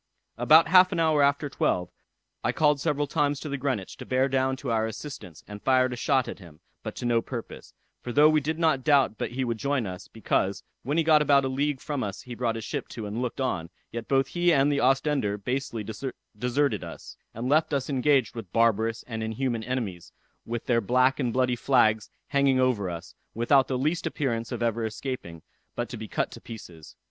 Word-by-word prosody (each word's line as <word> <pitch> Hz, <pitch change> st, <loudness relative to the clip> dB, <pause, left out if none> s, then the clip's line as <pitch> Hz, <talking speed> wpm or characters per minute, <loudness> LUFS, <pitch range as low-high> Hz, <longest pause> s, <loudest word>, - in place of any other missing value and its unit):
About 155 Hz, +8 st, +6 dB
half 185 Hz, +2 st, +6 dB
an 175 Hz, -, -1 dB
hour 160 Hz, -2 st, +3 dB
after 140 Hz, +1 st, +2 dB
twelve, 90 Hz, -9 st, -1 dB, 0.5 s
I -, -, +2 dB
called 150 Hz, -2 st, +2 dB
several 145 Hz, -2 st, 0 dB
times 145 Hz, 0 st, 0 dB
to 155 Hz, -, -5 dB
the 140 Hz, -, -2 dB
Greenwich 130 Hz, -8 st, -3 dB
to -, -, -8 dB
bear 130 Hz, +1 st, +2 dB
down 130 Hz, 0 st, +1 dB
to 130 Hz, -2 st, -4 dB
our 110 Hz, -1 st, +1 dB
assistance, 110 Hz, -, -8 dB
and 105 Hz, 0 st, -9 dB
fired 130 Hz, -1 st, +3 dB
a -, -, -3 dB
shot 130 Hz, +1 st, +1 dB
at -, -, -7 dB
him, 85 Hz, -5 st, -14 dB, 0.2 s
but -, -, -6 dB
to -, -, -5 dB
no 120 Hz, -1 st, +2 dB
purpose; 120 Hz, -2 st, -8 dB, 0.3 s
for 125 Hz, -, -5 dB
though 145 Hz, +5 st, +6 dB
we 155 Hz, -1 st, +3 dB
did 155 Hz, +3 st, -2 dB
not 160 Hz, -6 st, +2 dB
doubt 140 Hz, -6 st, +3 dB
but -, -, -3 dB
he 130 Hz, +1 st, -1 dB
would 115 Hz, -3 st, -2 dB
join 140 Hz, -3 st, 0 dB
us, 90 Hz, 0 st, -7 dB
because, 100 Hz, -3 st, -1 dB, 0.2 s
when 145 Hz, +5 st, -2 dB
he 165 Hz, -, +3 dB
got 155 Hz, -1 st, +5 dB
about 140 Hz, -2 st, +4 dB
a -, -, -1 dB
league 140 Hz, +1 st, -1 dB
from 145 Hz, -1 st, -3 dB
us 100 Hz, -2 st, -5 dB
he 125 Hz, -, -8 dB
brought 120 Hz, -1 st, -1 dB
his 115 Hz, -, -5 dB
ship -, -, -4 dB
to 110 Hz, -, -7 dB
and 105 Hz, +4 st, -4 dB
looked 125 Hz, 0 st, -3 dB
on, 85 Hz, -11 st, -2 dB, 0.2 s
yet 115 Hz, -1 st, -6 dB
both 135 Hz, -1 st, +2 dB
he 175 Hz, 0 st, +2 dB
and 140 Hz, -1 st, +4 dB
the 140 Hz, -, +1 dB
Ostender 135 Hz, -5 st, +1 dB
basely 120 Hz, 0 st, -3 dB, 0.5 s
deserted 125 Hz, -1 st, 0 dB
us, 85 Hz, -, -9 dB, 0.2 s
and 115 Hz, +3 st, -3 dB
left 155 Hz, +4 st, +3 dB
us 140 Hz, -2 st, -1 dB
engaged 135 Hz, -3 st, +2 dB
with 110 Hz, -7 st, -8 dB
barbarous 115 Hz, 0 st, +2 dB
and 110 Hz, -2 st, -5 dB
inhuman 115 Hz, +1 st, -2 dB
enemies, 110 Hz, -9 st, -4 dB, 0.4 s
with 120 Hz, 0 st, -4 dB
their 115 Hz, -2 st, +2 dB
black 130 Hz, +5 st, +2 dB
and 125 Hz, -4 st, 0 dB
bloody 125 Hz, 0 st, +1 dB
flags 110 Hz, -4 st, +2 dB, 0.2 s
hanging 140 Hz, -2 st, +3 dB
over 120 Hz, -7 st, +1 dB
us, 85 Hz, -1 st, -7 dB, 0.2 s
without 130 Hz, +4 st, +3 dB
the 130 Hz, -, -1 dB
least 155 Hz, +6 st, 0 dB
appearance 115 Hz, -6 st, -2 dB
of -, -, -3 dB
ever 115 Hz, 0 st, 0 dB
escaping, 110 Hz, -, -5 dB, 0.3 s
but -, -, -2 dB
to -, -, -6 dB
be -, -, -7 dB
cut -, -, -2 dB
to -, -, -11 dB
pieces. 85 Hz, -8 st, -11 dB
130 Hz, 215 wpm, -27 LUFS, 115-140 Hz, 0.5 s, About